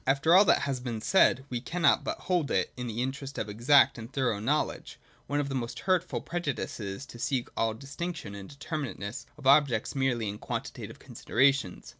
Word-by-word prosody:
After 140 Hz, +5 st, +3 dB
all 195 Hz, +3 st, +8 dB
that -, -, +4 dB
has 135 Hz, -2 st, -1 dB
been 120 Hz, -3 st, -4 dB
said, 130 Hz, -, +3 dB
we 120 Hz, -1 st, -2 dB
can 170 Hz, +6 st, -4 dB
not -, -, +5 dB
but -, -, -4 dB
hold 175 Hz, -5 st, 0 dB
it, 95 Hz, -, 0 dB
in 125 Hz, -1 st, -5 dB
the 115 Hz, +2 st, -2 dB
interest 135 Hz, +1 st, -5 dB
of 110 Hz, -, -2 dB
exact 130 Hz, +5 st, +4 dB
and 115 Hz, +3 st, -9 dB
thorough 130 Hz, -7 st, 0 dB
know 140 Hz, +8 st, +2 dB
ledge, -, -, -9 dB, 0.3 s
one 145 Hz, +1 st, 0 dB
of 145 Hz, -, -1 dB
the 135 Hz, -, -4 dB
most 120 Hz, -3 st, -4 dB
hurtful 185 Hz, -2 st, 0 dB
prejudices, 135 Hz, -, -4 dB
to 120 Hz, -, -12 dB
seek 125 Hz, 0 st, -1 dB
all 110 Hz, -1 st, 0 dB
dis 135 Hz, +4 st, -11 dB
tinction 175 Hz, -, -4 dB
and 100 Hz, -1 st, -9 dB
determinateness 140 Hz, -6 st, -5 dB
of 145 Hz, -, -13 dB
objects 135 Hz, -5 st, +4 dB
merely 125 Hz, -5 st, 0 dB
in 100 Hz, +1 st, -5 dB
quantitative -, -, -5 dB
considerations. 135 Hz, -6 st, 0 dB
135 Hz, 200 wpm, -29 LUFS, 115-145 Hz, 0.3 s, all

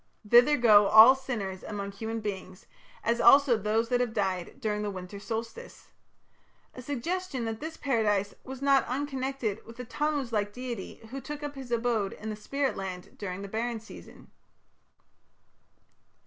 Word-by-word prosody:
Thither 245 Hz, +7 st, +6 dB
go 210 Hz, -4 st, +6 dB
"all 220 Hz, +5 st, +9 dB
sinners 225 Hz, -8 st, -5 dB
among 200 Hz, -1 st, -5 dB
human 220 Hz, +3 st, -5 dB
beings, 190 Hz, -3 st, -6 dB, 0.4 s
as 235 Hz, +1 st, +1 dB
also 280 Hz, -3 st, +7 dB
(those) 220 Hz, +2 st, 0 dB
that 245 Hz, -1 st, +2 dB
have 245 Hz, -2 st, -1 dB
died 190 Hz, 0 st, -2 dB
during 210 Hz, -4 st, -1 dB
the 210 Hz, -, -2 dB
winter 185 Hz, +1 st, -7 dB
solstice" 230 Hz, -, -7 dB, 0.8 s
a 255 Hz, -, -9 dB
suggestion 285 Hz, +1 st, -3 dB
that 225 Hz, -1 st, -4 dB
this 320 Hz, +1 st, -6 dB
Paradise 210 Hz, -7 st, 0 dB
was 265 Hz, +1 st, -8 dB
not 275 Hz, -1 st, +4 dB
unconnected 265 Hz, -5 st, -3 dB
with 230 Hz, +1 st, -13 dB
the 250 Hz, -, -6 dB
Tammuz 290 Hz, -1 st, -2 dB
like 205 Hz, -1 st, 0 dB
deity 250 Hz, -1 st, -6 dB
who 270 Hz, +1 st, -5 dB
took 295 Hz, +1 st, -7 dB
up 290 Hz, -1 st, -4 dB
his 265 Hz, -3 st, -9 dB
abode 230 Hz, -4 st, 0 dB
in 220 Hz, +1 st, -6 dB
the -, -, -4 dB
spirit 275 Hz, +6 st, -2 dB
land 185 Hz, -2 st, -7 dB
during 195 Hz, -1 st, -5 dB
the -, -, -6 dB
barren 230 Hz, +3 st, -2 dB
season. 220 Hz, -, -14 dB
230 Hz, 160 wpm, -28 LUFS, 205-265 Hz, 0.8 s, all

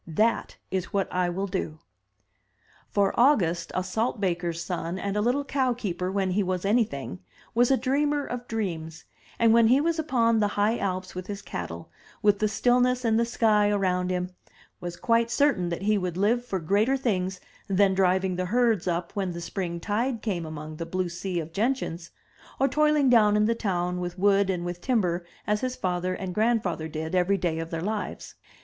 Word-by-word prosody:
That 215 Hz, +8 st, 0 dB
is 185 Hz, -2 st, -1 dB
what 195 Hz, -1 st, 0 dB
I 180 Hz, -1 st, +1 dB
will 190 Hz, +3 st, -2 dB
do.'' 185 Hz, -5 st, -3 dB, 1.1 s
For 200 Hz, -1 st, +2 dB
August, 180 Hz, -, +3 dB
a 185 Hz, -, 0 dB
salt 220 Hz, +5 st, -1 dB
baker's 175 Hz, -3 st, -1 dB
son 170 Hz, 0 st, -3 dB
and 200 Hz, +1 st, -3 dB
a 210 Hz, -, +1 dB
little 250 Hz, +6 st, +1 dB
cow 265 Hz, -2 st, +1 dB
keeper 185 Hz, -5 st, -3 dB
when 190 Hz, -1 st, 0 dB
he 200 Hz, +3 st, +1 dB
was 185 Hz, -1 st, -2 dB
anything, 200 Hz, -, 0 dB, 0.3 s
was 240 Hz, +1 st, +4 dB
a 270 Hz, -, +4 dB
dreamer 285 Hz, +3 st, +1 dB
of 245 Hz, 0 st, -6 dB
dreams, 165 Hz, -7 st, -4 dB, 0.3 s
and 230 Hz, -1 st, +4 dB
when 230 Hz, -1 st, +6 dB
he 255 Hz, +4 st, +5 dB
was 330 Hz, +2 st, 0 dB
upon 230 Hz, -7 st, +2 dB
the 210 Hz, -, +3 dB
high 210 Hz, +3 st, +2 dB
alps 185 Hz, -1 st, -3 dB
with 185 Hz, 0 st, -6 dB
his 205 Hz, -1 st, -6 dB
cattle, 85 Hz, -1 st, -6 dB, 0.3 s
with 205 Hz, -1 st, +4 dB
the 215 Hz, -, +2 dB
stillness 250 Hz, +3 st, +2 dB
and 225 Hz, 0 st, +3 dB
the 235 Hz, -, +2 dB
sky 215 Hz, -3 st, +3 dB
around 185 Hz, -3 st, +1 dB
him, 180 Hz, 0 st, -2 dB, 0.5 s
was 175 Hz, 0 st, -6 dB
quite 230 Hz, 0 st, +2 dB
certain 235 Hz, -9 st, +2 dB
that 170 Hz, +2 st, -4 dB
he 210 Hz, 0 st, +2 dB
would 180 Hz, -2 st, -3 dB
live 225 Hz, +5 st, +2 dB
for 200 Hz, -6 st, -3 dB
greater 205 Hz, +10 st, +2 dB
things 190 Hz, -7 st, -1 dB, 0.3 s
than 195 Hz, 0 st, +3 dB
driving 190 Hz, -1 st, +2 dB
the 185 Hz, -, -1 dB
herds 225 Hz, -2 st, +2 dB
up 170 Hz, 0 st, -1 dB
when 190 Hz, -3 st, -1 dB
the 170 Hz, -, -6 dB
spring 170 Hz, -1 st, -4 dB
tide 225 Hz, +5 st, -1 dB
came 175 Hz, -7 st, -2 dB
among 155 Hz, 0 st, -7 dB
the 165 Hz, -, -4 dB
blue 185 Hz, -1 st, -1 dB
sea 175 Hz, +1 st, -3 dB
of 165 Hz, 0 st, -6 dB
gentians, 200 Hz, -6 st, -1 dB, 0.5 s
or 270 Hz, -, +4 dB
toiling 300 Hz, 0 st, +3 dB
down 215 Hz, -4 st, +5 dB
in 210 Hz, -, +3 dB
the 230 Hz, -, +2 dB
town 180 Hz, -5 st, -1 dB
with 175 Hz, 0 st, -4 dB
wood 200 Hz, 0 st, +3 dB
and 175 Hz, -2 st, -1 dB
with 175 Hz, 0 st, -5 dB
timber 185 Hz, -9 st, 0 dB, 0.2 s
as 210 Hz, 0 st, 0 dB
his 255 Hz, 0 st, -2 dB
father 180 Hz, -2 st, -1 dB
and 185 Hz, -2 st, -5 dB
grandfather 210 Hz, -7 st, 0 dB
did 160 Hz, +1 st, -5 dB
every 185 Hz, +2 st, +2 dB
day 170 Hz, -3 st, -1 dB
of 165 Hz, 0 st, -4 dB
their 165 Hz, 0 st, -4 dB
lives. 210 Hz, +1 st, -4 dB
195 Hz, 195 wpm, -26 LUFS, 180-230 Hz, 1.1 s, when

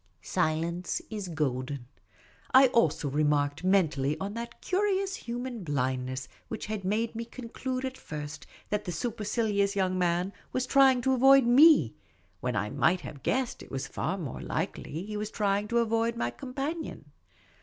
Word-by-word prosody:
Silence 165 Hz, -, -1 dB
is 210 Hz, -3 st, -4 dB
golden. 135 Hz, -5 st, -2 dB, 0.7 s
I 260 Hz, 0 st, +8 dB
also 165 Hz, -, +2 dB
remarked 145 Hz, +1 st, +1 dB
mentally 160 Hz, -7 st, +2 dB
on 200 Hz, +1 st, -3 dB
that 235 Hz, +1 st, -6 dB
curious 390 Hz, 0 st, 0 dB
human 240 Hz, -2 st, -5 dB
blindness 130 Hz, -3 st, -2 dB, 0.2 s
which -, -, -5 dB
had 215 Hz, -2 st, -4 dB
made 215 Hz, +4 st, 0 dB
me 230 Hz, +1 st, -4 dB
conclude 255 Hz, +2 st, -5 dB
at 260 Hz, 0 st, -5 dB
first 150 Hz, -1 st, -7 dB, 0.2 s
that 210 Hz, 0 st, -1 dB
the 180 Hz, -, -3 dB
su 230 Hz, +9 st, -2 dB
percilious 210 Hz, -2 st, 0 dB
young 185 Hz, -1 st, +1 dB
man 180 Hz, +2 st, +1 dB, 0.2 s
was 255 Hz, -, 0 dB
trying 265 Hz, -1 st, +5 dB
to 265 Hz, +1 st, +2 dB
avoid 270 Hz, +1 st, +7 dB
7)ie, 265 Hz, -, +6 dB, 0.5 s
when -, -, -2 dB
I 105 Hz, -, -1 dB
might 175 Hz, +3 st, +2 dB
have 140 Hz, -, -9 dB
guessed 255 Hz, -, -1 dB
it -, -, -12 dB
was 135 Hz, 0 st, -3 dB
far 190 Hz, -, -2 dB
more 155 Hz, -10 st, -5 dB
likely 165 Hz, +6 st, -3 dB
he 210 Hz, 0 st, -5 dB
was 210 Hz, 0 st, -3 dB
trying 205 Hz, -1 st, 0 dB
to 235 Hz, -, 0 dB
avoid 230 Hz, 0 st, +1 dB
my 120 Hz, -, -1 dB
companion. 280 Hz, -, -5 dB
200 Hz, 160 wpm, -29 LUFS, 155-245 Hz, 0.7 s, I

